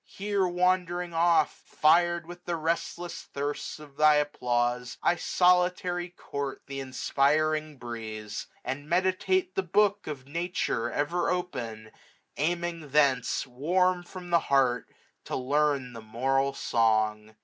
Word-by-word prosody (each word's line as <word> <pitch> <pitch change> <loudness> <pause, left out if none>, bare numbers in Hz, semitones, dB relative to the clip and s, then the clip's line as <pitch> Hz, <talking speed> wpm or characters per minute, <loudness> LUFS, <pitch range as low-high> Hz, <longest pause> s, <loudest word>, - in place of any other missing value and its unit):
Here 200 -1 -1
wandering 180 -1 0
oft, 165 -2 +2
fir*d 170 +2 +3
with 175 +1 -11
the 175 - -1
restless 170 +2 -2
thirst 145 +2 -4
Of 145 -2 -14
thy 155 0 +6
applause, 125 -4 0
I - - +4
solitary 180 0 +2
court 140 -5 -6
Th' - - -15
inspiring 150 +3 +1
breeze; 110 -3 -6 0.2
and 145 +4 -4
meditate 185 +1 +1
the 190 - +1
book 205 +2 +2
Of 140 -4 -6
Nature 165 -7 -2
ever 170 +4 0
open; 120 -12 -4 0.4
aiming 170 0 -2
thence, 135 -4 +3
670 125 -1 -4
Warm 180 +2 +2
from 180 0 -10
the 170 - +5
heart, 135 -5 +1 0.4
to - - -3
learn 140 -1 +1
the 115 - -8
moral 135 +5 0
song. 110 -1 +1
155 Hz, 125 wpm, -28 LUFS, 130-175 Hz, 0.4 s, thy